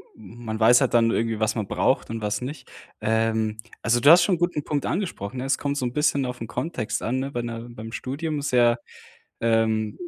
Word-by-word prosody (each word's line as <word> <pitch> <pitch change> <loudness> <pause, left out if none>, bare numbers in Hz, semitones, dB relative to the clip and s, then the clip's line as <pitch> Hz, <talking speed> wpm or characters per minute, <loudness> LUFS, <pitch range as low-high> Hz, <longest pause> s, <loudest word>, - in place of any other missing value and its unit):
hm, 110 +3 -13
man 110 -1 -3
weiß 120 +3 +6
halt 135 - +1
dann 115 -1 +4
irgendwie, 115 -1 0
was 110 +1 +1
man 110 -4 -2
braucht - - +1
und 115 0 -4
was 105 +2 -2
nicht. 130 0 -7 0.3
Ähm, 110 -1 0 0.2
also 120 +1 +2
du 145 - +6
hast 175 +2 +8
schon 190 - +2
'n - - -6
guten 175 -4 0
Punkt 145 -1 -2
angesprochen, 130 - -3
ne? 125 - -3
Es 135 0 +1
kommt 140 0 -2
so 130 - -1
'n 120 - -3
bisschen 145 -2 +1
auf 125 -1 -6
'n 115 - -4
Kontext 125 -2 -3
an, 125 +3 -1
ne, 135 +1 -4
wenn, 120 0 -2
äh, 115 -1 -5
beim 115 -1 -9
Studium 150 +3 -3
sehr, 120 -4 +3 0.6
ähm, 110 -2 +1
120 Hz, 225 wpm, -24 LUFS, 110-140 Hz, 0.6 s, hast